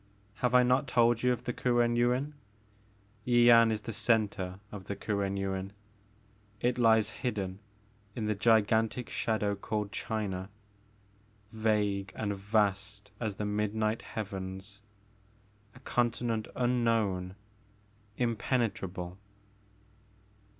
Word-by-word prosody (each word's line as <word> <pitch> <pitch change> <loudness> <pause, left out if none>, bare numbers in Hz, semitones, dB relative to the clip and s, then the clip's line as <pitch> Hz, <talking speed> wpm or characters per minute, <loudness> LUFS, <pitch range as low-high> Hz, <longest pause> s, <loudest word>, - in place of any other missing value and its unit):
Have 125 0 +1
I 125 - +7
not 130 +3 +2
told 120 -1 +3
you 125 - +3
of 120 -1 -2
the 125 - -2
Kuen 120 -1 +2
Yuin? 125 +5 +1 0.9
Yian 120 -2 +6
is 110 -1 -2
the 115 - -6
centre 100 -5 0
of 100 -2 -8
the 100 - -4
Kuen 100 -2 -2
Yuin. 95 0 -3 0.9
It 125 +2 0
lies 110 -2 +4
hidden 100 -6 -2 0.6
in 110 - -2
that 105 -1 -1
gigantic 110 +1 +2
shadow 105 -2 0
called 105 +1 -3
China, 100 -3 -3 1.0
vague 105 -3 0
and 100 -2 -2
vast 100 0 -1
as 110 -4 -2
the 105 - -3
midnight 105 +1 -1
Heavens, 95 -1 -6 0.5
— 105 0 -33
a - - -13
continent 120 -3 0
unknown, 115 -7 +1 0.8
impenetrable." 105 -7 -1
110 Hz, 110 wpm, -30 LUFS, 100-120 Hz, 1.0 s, I